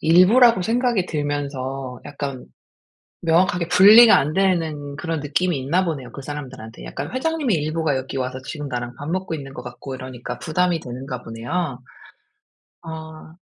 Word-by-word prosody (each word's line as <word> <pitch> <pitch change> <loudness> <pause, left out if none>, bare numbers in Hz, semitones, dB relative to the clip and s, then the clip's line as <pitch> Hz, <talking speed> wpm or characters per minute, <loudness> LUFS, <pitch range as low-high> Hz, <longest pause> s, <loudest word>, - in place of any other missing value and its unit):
일부라고 190 +6 +6
생각이 235 -3 +1
들면서 135 -4 -3
약간 140 -3 -5 0.8
명확하게 175 +1 +2
분리가 210 +6 +9
안 150 +3 0
되는 160 -7 0
그런 165 +1 -3
느낌이 150 +4 0
있나 155 +8 +1
보네요, 135 -7 -4
그 - - -8
사람들한테. 130 - -8
약간 - - -6
회장님의 270 - 0
일부가 155 -1 0
여기 135 +1 -5
와서 130 0 -3
지금 150 0 -6
나랑 120 -1 -4
밥 145 - -5
먹고 185 0 -2
있는 135 -2 -8
것 125 - -7
같고 125 +2 -7
이러니까 130 -1 -7
부담이 175 +1 0
되는가 125 0 -7
보네요. 125 +5 -3 1.0
아. 160 -1 -9
150 Hz, 345 characters per minute, -22 LUFS, 130-180 Hz, 1.0 s, 분리가